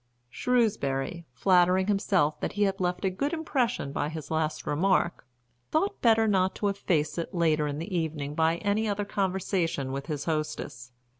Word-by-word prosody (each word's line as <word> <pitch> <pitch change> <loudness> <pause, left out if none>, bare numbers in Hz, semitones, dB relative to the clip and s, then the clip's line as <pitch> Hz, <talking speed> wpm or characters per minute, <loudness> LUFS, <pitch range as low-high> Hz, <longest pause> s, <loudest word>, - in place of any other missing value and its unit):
Shrewsbury, 170 - 0
flattering 180 +5 +3
himself 190 -6 +1
that - - -3
he 205 - +1
had 195 -1 0
left 180 0 -1
a 190 - +2
good 280 - -2
impression 255 - -1
by 145 +1 -1
his 155 -1 -7
last 155 -1 -1
remark, 175 -2 +1 0.4
thought 390 +6 0
better 225 -2 +4
not 190 -2 +2
to 205 - 0
efface 175 -5 0
it 170 - -5
later 155 -3 +2
in 145 0 -3
the 180 +5 -4
evening 155 -4 -2
by 160 +2 +2
any 210 +3 0
other 205 0 -1
conversation 185 -8 -1
with 135 +1 -4
his 150 -3 -3
hostess. 150 -6 -3
180 Hz, 165 wpm, -28 LUFS, 155-200 Hz, 0.4 s, better